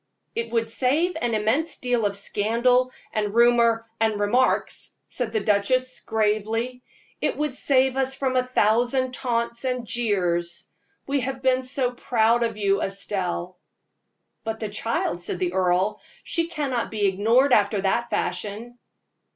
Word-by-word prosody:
"It 230 0 -3
would 225 -1 -1
save 300 +9 +1
an 235 -2 0
immense 255 +10 0
deal 245 -4 0
of 200 0 -5
scandal, 240 +5 +1 0.2
and 210 -1 -1
rumor, 235 -1 +4
and 220 -2 +1
remarks," 240 +6 +1
said 245 -3 -3
the 220 -1 0
duchess, 250 +6 +1
gravely; 220 +3 -1 0.4
"it - - 0
would 300 -2 -1
save 265 -1 +2
us 265 0 +1
from 265 -1 -1
a 255 - +4
thousand 250 +2 +1
taunts 235 -2 -2
and 250 -2 -2
jeers. 180 -7 -1 0.4
We 280 0 0
have 265 +1 -4
been 260 0 +3
so 255 -1 -1
proud 235 -1 +2
of 230 -2 -1
you, 200 -1 +1
Estelle!" 185 -2 -3 0.8
"But 220 0 -4
the 215 - -3
child," 205 -4 -2
said 175 - -3
the 180 0 -1
earl 185 +2 +1 0.2
"she 335 -1 -1
cannot 285 -8 -2
be 210 -2 -1
ignored 225 +8 +3
after 205 -2 +3
that 235 +5 0
fashion." 210 +7 -3
230 Hz, 145 wpm, -24 LUFS, 205-255 Hz, 0.8 s, rumor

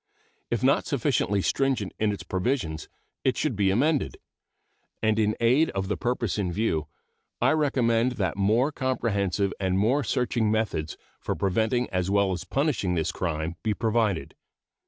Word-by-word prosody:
If - - -1
not - - +3
sufficiently 100 0 +1
stringent 130 -8 0
in 110 -1 +2
its 100 - -5
provisions, 95 - -2 0.3
it - - +1
should - - 0
be 100 -1 +2
amended; 140 +9 +1 0.9
and 110 0 +2
in 105 0 +2
aid 125 +7 +4
of 95 0 -2
the 105 - +1
purpose 120 +2 -1
in 90 -3 -1
view 85 -6 -1 0.5
I - - +3
recommend 125 -6 +2
that 95 -8 -1
more 110 +9 +2
comprehensive 100 - 0
and 95 -1 0
more 125 +9 +2
searching 120 -4 0
methods 110 -8 -1 0.2
for - - -3
preventing 110 +6 +1
as 90 0 0
well 100 -1 +2
as 90 0 -4
punishing 130 - 0
this 80 -2 0
crime 80 -1 -3
be 110 -2 0
provided. 110 -6 0
105 Hz, 155 wpm, -26 LUFS, 95-120 Hz, 0.9 s, aid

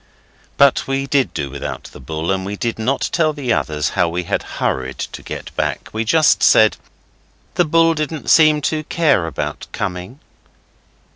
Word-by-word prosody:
But 140 -1 +4
we 135 0 -1
did 140 -1 +1
do 70 -4 -4
without 70 - -6
the - - -11
bull, 80 +6 -3
and 95 -1 -1
we 100 +2 -4
did 115 +2 -3
not 130 +5 0
tell 155 -2 +2
the 135 -5 -1
others 75 0 -1
how - - +1
we 90 +2 -3
had - - -1 0.2
hurried 65 0 -2
to - - -6
get - - -8
back. - - -2
We 110 +1 -1
just 155 +6 +4
said, 110 -1 +5 0.8
'The 175 - +2
bull 165 +1 +4
didn't 155 0 -2
seem 155 -2 +5
to 155 +2 -1
care 155 - +2
about 80 - -5
coming. 95 +6 -5
125 Hz, 170 wpm, -19 LUFS, -, 0.8 s, said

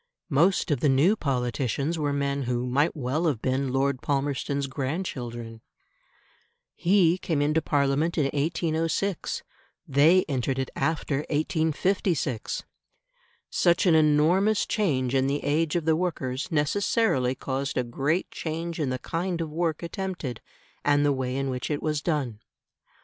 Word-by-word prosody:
Most 170 +4 +3
of 145 - +1
the 145 - +2
new 145 +10 +4
politicians 135 - -1
were 145 -1 0
men 140 0 -1
who 125 0 0
might 140 +7 +1
well 150 +4 -1
have 140 -8 0
been 130 +2 -1
Lord 135 0 0
Palmerston's 140 0 -1
grandchildren. 130 -5 -4 1.1
He 180 -1 +3
came 160 -5 -1
into 155 +2 +2
Parliament 145 +4 +1
in 155 - +3
1806, 165 +5 -1 0.4
they 155 +7 +5
entered 135 -2 -1
it 130 -1 -2
after 160 -3 0
1856. 155 - 0 0.9
Such 170 +1 +3
an 175 - +5
enormous 160 +7 +4
change 135 - 0
in 135 0 +2
the 145 +1 -1
age 150 +2 +1
of 170 -3 0
the 160 -1 +3
workers 150 -7 -2
necessarily 150 - +1
caused 135 +1 -3
a 125 - +2
great 140 +8 -1
change 165 +1 -4
in 145 -4 0
the 130 - -1
kind 170 +5 -3
of 160 -2 -3
work 165 0 -1
attempted 170 - -4 0.4
and 145 0 +3
the 145 - +3
way 130 -1 -2
in 135 0 -1
which 125 -1 -4
it 145 -1 -2
was 150 -2 0
done. 140 -11 -1
145 Hz, 145 wpm, -26 LUFS, 135-165 Hz, 1.1 s, they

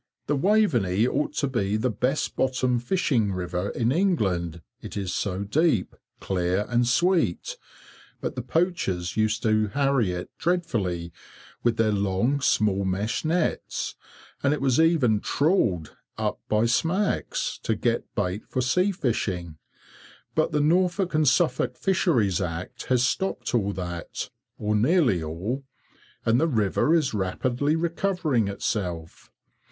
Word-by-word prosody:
The 145 - 0
Waveney 135 - +2
ought 140 +4 -1
to 145 -1 0
be 105 -6 0
the 125 +3 0
best 125 +7 -1
bottom 130 -2 +1
fishing 120 - +1
river 90 +1 -2
in 120 0 0
England, 95 - 0 0.2
it - - -7
is 95 -2 -2
so 100 -1 -2
deep, 130 - +1 0.2
clear, 90 +2 0
and 120 0 +2
sweet, 165 - +1 0.6
but - - -3
the 125 - -3
poachers 125 - -1
used 110 +1 +1
to 110 -1 +2
harry 135 -4 +1
it 90 0 -5
dreadfully, 105 - -1 0.5
with 120 -1 +1
their 110 -1 +3
long, 100 +7 +1
small 100 -5 +2
meshed 100 - -1
nets, 165 +1 -1 0.5
and 140 +2 +2
it - - -6
was 135 -1 +2
even 155 -10 +4
trawled 115 - +1 0.2
up - - -2
by 110 +1 +3
smacks, 170 - 0
to - - 0
get - - -1
bait 90 +4 -1
for 130 - -1
sea 180 +10 +2
fishing, 95 - -2 0.7
but - - +1
the 150 - +1
Norfolk 180 +4 +2
and 155 -1 +3
Suffolk 165 +6 +2
Fisheries 125 - +1
Act 85 0 -5
has 125 -1 +2
stopped 190 +5 -1
all 100 -4 +1
that, 90 -2 -5 0.3
or 105 0 -1
nearly 120 - +3
all, 90 - -4 0.6
and 115 +2 +3
the 165 - +3
river 110 - +1
is 160 -7 +2
rapidly 120 +9 0
recovering 165 - 0
itself. 90 -5 -4
120 Hz, 135 wpm, -25 LUFS, 95-155 Hz, 0.7 s, even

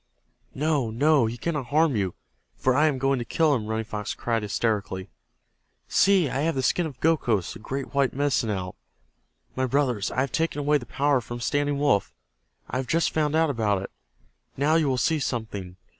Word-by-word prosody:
"No! 145 -4 0
No! 140 +2 +3
He 115 +2 -5
cannot 150 -2 -3
harm 150 +1 +3
you, 95 -4 -1 0.4
for 130 -1 +2
I 150 +3 +4
am 145 -3 0
going 135 0 +1
to - - -2
kill 155 +6 +2
him!" 110 -6 -1
Running 110 0 -2
Fox 105 -1 -4
cried, 115 -1 -1
hysterically. 100 -4 -2 0.8
"See, 195 -5 +4
I 135 - -2
have 160 +2 0
the 130 - -1
skin 170 +6 +1
of 135 -5 -11
Gokhos, 120 - +1
the - - -10
great 135 +6 -5
white 140 -2 +2
Medicine 140 -4 0
Owl. 90 -3 -3 0.8
My 130 0 0
brothers, 125 -6 0
I 130 - -1
have 135 -1 -1
taken 165 -2 -1
away 145 0 +2
the 120 - -11
power 140 0 +1
from 120 +1 -7
Standing 145 +3 0
Wolf. 140 - +1 0.5
I 125 - -3
have 130 -1 -3
just 165 +4 +1
found 155 -1 0
out 160 -2 +3
about 105 -6 0
it. 95 - -7 0.7
Now 145 +3 +2
you 160 -2 +3
will 130 - +1
see 160 +5 +1
something. 105 -9 -4
130 Hz, 195 wpm, -25 LUFS, 110-150 Hz, 0.8 s, I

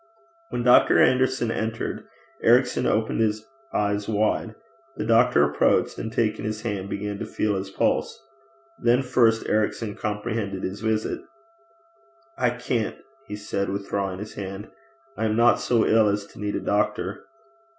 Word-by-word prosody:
When 120 - -2
Dr. 125 0 +6
Anderson 130 -2 +3
entered, 110 0 -3 0.3
Ericson 125 +2 +3
opened 110 +1 0
his 110 -1 0 0.3
eyes 105 0 -1
wide. 110 +1 0 0.4
The - - -2
doctor 115 -7 +4
approached, 75 0 +2
and 110 - -4
taking 110 -2 0
his 110 +1 -4
hand 100 -4 -3
began 100 0 -4
to - - -4
feel 105 -1 -1
his 95 0 -4
pulse. - - 0 0.6
Then 120 +2 +3
first 115 -3 +2
Ericson 110 0 0
comprehended 105 -2 -3
his 95 +3 -4
visit. 110 -1 -1 1.1
'I - - +2
can't,' 120 -2 -2 0.3
he 105 - -5
said, 100 -1 -3
withdrawing 100 -1 -3
his 105 +2 -8
hand. 95 +1 -7 0.5
'I 110 - -1
am 110 -1 +1
not 120 +1 +4
so 115 -3 +2
ill 110 -1 +4
as 100 0 -1
to - - -16
need 105 -1 -2
a - - -2
doctor.' - - -1
110 Hz, 150 wpm, -24 LUFS, 100-115 Hz, 1.1 s, Dr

